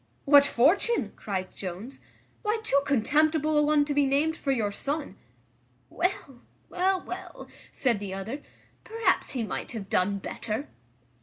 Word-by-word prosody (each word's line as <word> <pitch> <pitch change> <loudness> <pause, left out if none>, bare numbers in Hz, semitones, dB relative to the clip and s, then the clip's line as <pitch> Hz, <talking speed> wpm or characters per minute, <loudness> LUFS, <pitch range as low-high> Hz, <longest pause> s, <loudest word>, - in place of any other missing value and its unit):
"What 285 0 +7
fortune?" 355 - +2
cries 190 -3 -4
Jones, 195 +8 -7 0.4
"why, 425 0 0
too 280 -9 +3
contemptible 305 +4 +2
a 295 - +5
one 295 0 +3
to 290 - -2
be 285 -1 +3
named 295 +4 +2
for 280 - -2
your 220 -6 0
son." 285 0 -4 0.8
"Well, 315 -7 -2 0.3
well, 375 +1 +1
well," - - -8 0.2
said 245 -6 +1
the 200 -2 -5
other, 215 +9 -5 0.4
"perhaps 455 0 0
he 250 -4 -1
might 215 - -5
have 200 -4 -7
done 200 +2 +2
better." 215 +6 -5
280 Hz, 145 wpm, -27 LUFS, 215-310 Hz, 0.8 s, What